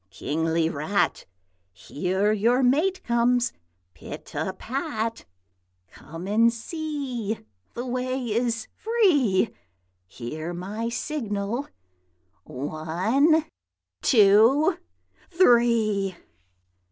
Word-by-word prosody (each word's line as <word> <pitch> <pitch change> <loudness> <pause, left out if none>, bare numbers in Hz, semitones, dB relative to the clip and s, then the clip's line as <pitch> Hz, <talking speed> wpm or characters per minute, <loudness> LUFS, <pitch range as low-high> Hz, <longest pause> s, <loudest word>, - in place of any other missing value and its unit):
Kingly 160 - -1
Rat! 160 +6 -1 0.4
Here 185 - -1
your 235 +5 +2
mate 315 +10 +2
comes 240 0 +2 0.4
pit 80 - -10
a - - -2
pat. 230 - -4 0.7
Come 165 +4 -9
and 225 +3 +4
see; 250 - -4 0.3
the 240 - -4
way 255 +1 -2
is 230 -1 -1
free; 350 - +2 0.6
Hear 155 - -6
my 210 +6 -4
signal: 235 -2 -3 0.8
one! 185 - +1 0.6
two! 225 +6 +5 0.5
three!' 230 - +3
230 Hz, 80 wpm, -25 LUFS, 190-255 Hz, 0.8 s, two